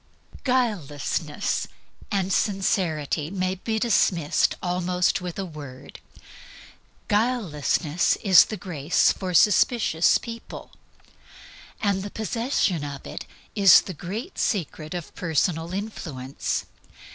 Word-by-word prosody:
_ - - -26
Guilelessness 175 - -1 0.4
and 195 -2 0
Sincerity 175 -7 0
may 185 0 -1
be 220 +4 -3
dismissed 190 -9 +2
almost 180 0 0
without 180 +2 -4
a - - -5
word. 145 -6 -10 1.1
Guilelessness 180 - +1
is 190 -4 +8
the 215 - -6
grace 165 -4 +1
for 185 -2 -4
suspicious 210 -4 +4
people. 230 -1 -9 1.1
The 200 -1 0
possession 220 - -1
of 140 -1 -7
it - - -7 0.3
is 200 -4 +7
THE 190 - -7
GREAT 210 - -6
SECRET 160 -4 -2
OF 175 -2 -6
PERSONAL 165 0 -1
INFLUENCE. 160 -10 -4
180 Hz, 100 wpm, -25 LUFS, 155-205 Hz, 1.1 s, is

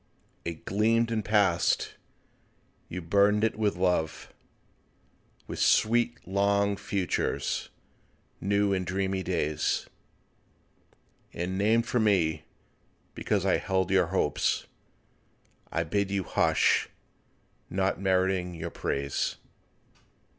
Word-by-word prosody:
It 85 0 -6
gleamed 115 +3 +2
and 110 -2 -1
passed—you 95 -2 -2
burdened 100 +4 +3
it 110 - +1
with 105 -1 0
love, 90 -3 -1 1.1
With - - -6
sweet 120 +1 +3
long 100 +1 +2
futures, 95 -2 -2 0.7
new 100 0 +1
and 95 -1 0
dreamy 95 +1 -1
days: 75 -5 -1 1.5
And 90 +2 -3
named 110 +4 +2
for 120 - 0
me—because 85 -8 -2
I - - +3
held 95 -1 -1
your 95 -3 +4
hopes. 85 -5 0 1.1
I 85 - 0
bid 100 +3 -1
you 100 -1 -1
hush—not 95 +2 -1
meriting 95 -2 +1
your 85 +1 -5
praise. 70 -1 -2
95 Hz, 90 wpm, -28 LUFS, 90-100 Hz, 1.5 s, your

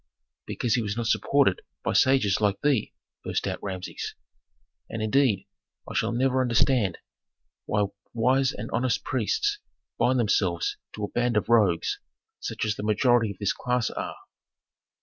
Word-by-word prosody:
"Because 120 -3 -1
he 120 - +2
was 105 0 -3
not 120 - -1
supported 120 -2 +2 0.2
by - - 0
sages 130 -8 +3
like 100 -1 +2
thee!" 140 -7 +2 0.3
burst - - -2
out - - -3
Rameses. 95 -2 -5 0.7
"And, 115 - -4
indeed, 110 -2 +2 0.4
I - - -7
shall - - +1
never 130 +2 +2
understand 120 -5 +2 0.7
why 105 -1 +2 0.3
wise 130 +3 +2
and 110 +3 -7
honest 115 -5 0
priests 410 - 0 0.4
bind 130 +1 +3
themselves 95 -6 +1 0.2
to 105 - -6
a 105 - -3
band 120 -2 +1
of 105 +1 0
rogues, 100 -8 +3 0.4
such - - -3
as 105 -1 -1
the - - -4
majority 115 +2 +3
of 100 - -7
this 100 - 0
class 125 -2 -1
are." - - -4
115 Hz, 150 wpm, -26 LUFS, 105-130 Hz, 0.7 s, sages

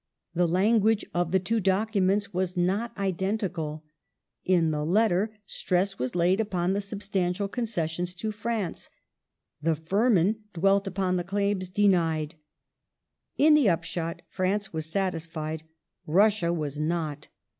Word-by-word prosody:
The 175 0 +2
language 215 +4 +3
of 175 -1 0
the 190 - +4
two 225 +5 0
documents 200 0 +1
was 180 0 -1
not 195 +7 +1
identical: 190 -5 -2 0.6
in 170 -4 +3
the 150 -1 -1
letter, 210 +4 +2
stress 190 +1 -1
was 130 +6 -2
laid 180 +3 +3
upon 185 -4 0
the 200 - 0
substantial 200 -1 -2
concessions 180 -6 -2
to 215 +5 -3
France; 215 -4 -3 0.7
the 160 +1 +2
Firman 200 +4 +2 0.2
dwelt 195 +3 +3
upon 185 -1 0
the 175 - -1
claims 200 0 -1
denied. 170 -6 +2 1.0
In 305 +2 +6
the 290 -8 +5
upshot, 165 0 -2
France 195 +1 -1
was 160 -1 -3
satisfied, 160 -3 -3 0.4
Russia 195 +1 +3
was 150 -4 -3
not. 155 -2 -2
185 Hz, 125 wpm, -27 LUFS, 170-205 Hz, 1.0 s, In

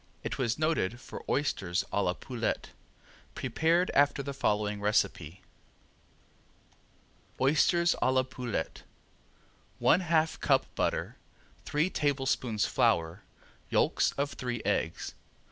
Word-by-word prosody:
It - - -4
was 125 -2 0
noted 150 -8 0
for - - -9
oysters 95 -11 0
a 100 - +1
la 90 -2 +1
poulette, 120 +4 -3 0.6
prepared 165 +8 +1
after 140 0 +3
the 140 +1 -4
following 105 -5 0
recipe: 95 -5 0 2.0
Oysters 165 +5 +3
a 130 - +3
La 130 0 +3
Poulette 125 -8 -4 1.0
One - - +4
half 160 -3 +1
cup - - +3
butter, - - -1 0.5
three 155 +5 0
tablespoons 135 -7 0
flour, 85 +3 +1 0.5
yolks - - +2
of 140 +1 -2
three 125 -2 -4
eggs. 80 - -1
130 Hz, 110 wpm, -30 LUFS, 105-145 Hz, 2.0 s, One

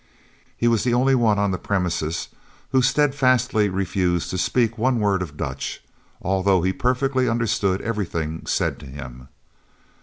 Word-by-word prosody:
He 120 - +1
was 115 -2 +2
the 120 -1 +2
only 130 +2 +3
one 115 -5 +3
on 100 -1 +1
the 90 - -2
premises 85 -4 -2 0.4
who 130 -1 +4
steadfastly 130 -5 +2
refused 90 -2 -1
to 95 - -2
speak 115 +2 +1
one 125 +1 +1
word 100 -3 +1
of 75 -5 -6
Dutch, 65 -4 -4 0.4
although 95 -1 +2
he 95 +1 +1
perfectly 130 +2 +1
understood 110 -5 0
everything 85 -8 -3
said - - 0
to - - -11
him. 65 -2 -9
100 Hz, 150 wpm, -23 LUFS, 90-125 Hz, 0.4 s, who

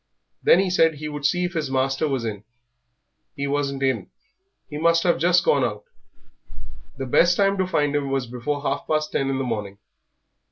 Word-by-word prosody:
Then 175 - +5
he 190 -1 +1
said 165 -3 +3
he 150 +1 -6
would 145 -1 -1
see 180 +3 0
if 175 - -4
his 160 -5 -2
master 135 +3 0
was 135 -5 -2
in. 105 -2 -5 0.9
He 140 - -3
wasn't 140 -1 -2
in; 125 -8 -1 0.6
he 150 - -6
must 165 +1 +3
have 175 - +2
just 175 +1 +3
gone 140 -2 +3
out. 105 -3 -3 1.1
The 135 - -4
best 170 +7 +3
time 195 0 +3
to 185 - +1
find 145 -5 0
him 140 -1 -1
was 135 -2 -1
before 125 +4 -4
half 140 0 -2
past 155 -1 0
ten 135 - 0
in 135 - -1
the 135 - -1
morning. 105 -5 -4
145 Hz, 195 wpm, -23 LUFS, 135-165 Hz, 1.1 s, Then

